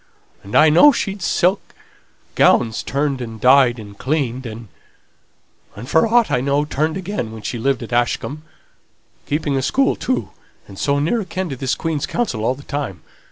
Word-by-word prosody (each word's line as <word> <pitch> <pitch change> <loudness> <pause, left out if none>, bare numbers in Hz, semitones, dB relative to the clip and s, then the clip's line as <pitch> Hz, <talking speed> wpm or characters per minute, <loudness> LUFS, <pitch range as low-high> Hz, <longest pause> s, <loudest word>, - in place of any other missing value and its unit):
And 100 - -8
I 155 0 +7
know 175 - +7
she'd 200 -7 -3
her - - -7
silk 185 +3 0 0.6
gowns 115 -2 +3
turned 140 -1 -2
and 115 -2 -7
dyed 125 0 +5
and 105 -2 -10
cleaned, 130 -1 -2
and, 110 0 -9 1.2
for 160 - +3
aught 235 0 +3
I 125 - +1
know, 140 +2 +1
turned 155 +3 -1
again, 185 - -4
while 110 -1 -10
she 120 - -4
lived 135 +1 0
at 115 - -7
Ashcombe. 120 +5 -1 0.9
Keeping 145 -1 -1
a - - 0
school, 265 - +1
too, 255 - -2 0.4
and 95 - -11
so 140 0 +1
near 165 +11 0
akin 185 -1 -4
to 135 - -4
this 130 0 -1
Queen's 160 -3 -2
counsel 160 - -2
all 125 +3 +1
the 140 - -13
time! 140 - -5
140 Hz, 175 wpm, -19 LUFS, 120-160 Hz, 1.2 s, I